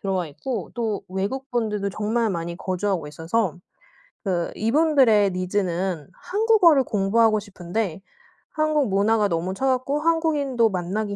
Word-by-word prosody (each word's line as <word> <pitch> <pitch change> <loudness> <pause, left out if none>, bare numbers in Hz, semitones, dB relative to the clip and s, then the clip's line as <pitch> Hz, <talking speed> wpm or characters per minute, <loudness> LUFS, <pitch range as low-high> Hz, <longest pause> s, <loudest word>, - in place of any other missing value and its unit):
들어와 190 -3 -1
있고 215 - -5
또 225 -4 -2
외국 205 +9 -3
분들도 210 -4 -1
정말 215 +4 0
많이 170 -1 -4
거주하고 185 -2 -2
있어서 165 +5 -1 0.7
그 175 -3 -1
이분들의 250 -3 +4
needs는 180 -3 -2
한국어를 380 - +3
공부하고 215 +2 +2
싶은데 195 -2 -4 0.5
한국 310 -5 +1
문화가 205 +2 +2
너무 175 +1 -2
차갑고 265 +5 0
한국인도 295 -8 +2
만나기 200 +3 -3
210 Hz, 330 characters per minute, -23 LUFS, 185-255 Hz, 0.7 s, 이분들의